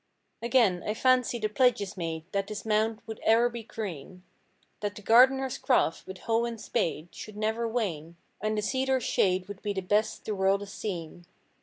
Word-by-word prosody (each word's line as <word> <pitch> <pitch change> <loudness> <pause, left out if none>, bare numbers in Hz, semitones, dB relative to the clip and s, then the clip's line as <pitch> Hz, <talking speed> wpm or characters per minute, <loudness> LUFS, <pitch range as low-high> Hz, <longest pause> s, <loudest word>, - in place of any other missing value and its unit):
Again 230 -7 +3
I 210 - -2
fancy 255 0 +3
the 215 -2 0
pledges 210 -3 +2
made 165 -3 -4
That 200 0 -1
this 215 0 -6
mound 220 +1 +1
would 220 -1 -7
e'er 230 +2 +4
be 235 -1 -6
green; 185 -5 -7
i8i 185 0 -40
That 205 -1 -3
the 210 - -10
gardener's 260 +4 +5
craft, 250 -10 +1
with 190 - -7
hoe 230 +1 +1
and 235 -1 -5
spade 165 -4 -2
Should 215 -1 -9
never 220 +2 0
wane. 170 -9 -3 0.3
And 215 +1 -1
the 210 - -1
cedar's 260 +2 0
shade 185 0 +1
Would 205 -1 -9
be 205 -1 -2
best 205 +3 0
the 215 - -2
world 195 0 +2
has 200 -1 -8
seen. 175 -3 -6
210 Hz, 185 wpm, -28 LUFS, 190-230 Hz, 0.3 s, gardener's